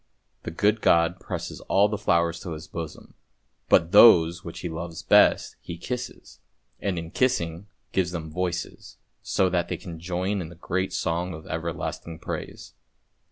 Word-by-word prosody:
The -, -, -5 dB
good 105 Hz, +6 st, +1 dB
God 85 Hz, +2 st, +3 dB
presses -, -, -6 dB
all 100 Hz, +2 st, +5 dB
the 105 Hz, -, -2 dB
flowers 85 Hz, -3 st, +1 dB
to 85 Hz, -, -6 dB
His 80 Hz, +1 st, -8 dB
bosom, 80 Hz, -4 st, -8 dB, 0.6 s
but 85 Hz, 0 st, +4 dB
those 85 Hz, -6 st, +7 dB
which 85 Hz, -, -8 dB
He -, -, -3 dB
loves 80 Hz, 0 st, -6 dB
best -, -, +4 dB
He 85 Hz, -, -7 dB
kisses, 125 Hz, +7 st, -6 dB, 0.4 s
and 95 Hz, -3 st, -2 dB
in 85 Hz, 0 st, -5 dB
kissing 105 Hz, -10 st, +1 dB
them 90 Hz, +5 st, -12 dB, 0.2 s
gives 95 Hz, -2 st, +1 dB
them 80 Hz, -3 st, -6 dB
voices, 90 Hz, +1 st, -4 dB, 0.2 s
so 95 Hz, -, +1 dB
that 90 Hz, -1 st, 0 dB
they -, -, -3 dB
can 85 Hz, -5 st, -9 dB
join 95 Hz, +3 st, -2 dB
in 80 Hz, -, -6 dB
the 85 Hz, -, -12 dB
great 95 Hz, +3 st, -2 dB
song 85 Hz, +1 st, -2 dB
of 80 Hz, -, -11 dB
everlasting 80 Hz, 0 st, -4 dB
praise. -, -, -7 dB
85 Hz, 165 wpm, -25 LUFS, 85-95 Hz, 0.6 s, those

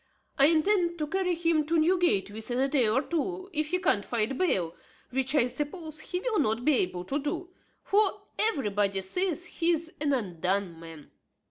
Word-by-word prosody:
I 275 Hz, -, +7 dB
intend 345 Hz, +2 st, +2 dB
to 305 Hz, -, -1 dB
carry 360 Hz, +2 st, 0 dB
him 330 Hz, -2 st, +2 dB
to 330 Hz, +1 st, +2 dB
Newgate 335 Hz, -, +2 dB
within 225 Hz, +4 st, -4 dB
a 270 Hz, -, +3 dB
day 265 Hz, -5 st, +2 dB
or 260 Hz, +6 st, +2 dB
two, 370 Hz, +5 st, -3 dB
if 305 Hz, -1 st, 0 dB
he 360 Hz, +4 st, +1 dB
can't 350 Hz, -, +1 dB
find 235 Hz, +3 st, -1 dB
bail, 185 Hz, -, 0 dB, 0.4 s
which, 265 Hz, +2 st, 0 dB
I 255 Hz, -, +5 dB
suppose, 305 Hz, +4 st, -5 dB
he 360 Hz, -, -3 dB
will 465 Hz, -2 st, 0 dB
not 230 Hz, -3 st, 0 dB
be 305 Hz, -, +5 dB
able 180 Hz, -2 st, -1 dB
to 275 Hz, +9 st, -1 dB
do; 325 Hz, +5 st, -4 dB, 0.3 s
for 405 Hz, 0 st, +2 dB, 0.2 s
everybody 205 Hz, -, +1 dB
says 355 Hz, -, -1 dB
he 340 Hz, -1 st, -1 dB
is 330 Hz, 0 st, 0 dB
an 295 Hz, -1 st, +1 dB
undone 185 Hz, -5 st, -1 dB
man. 165 Hz, -3 st, -11 dB
300 Hz, 185 wpm, -28 LUFS, 215-350 Hz, 0.4 s, I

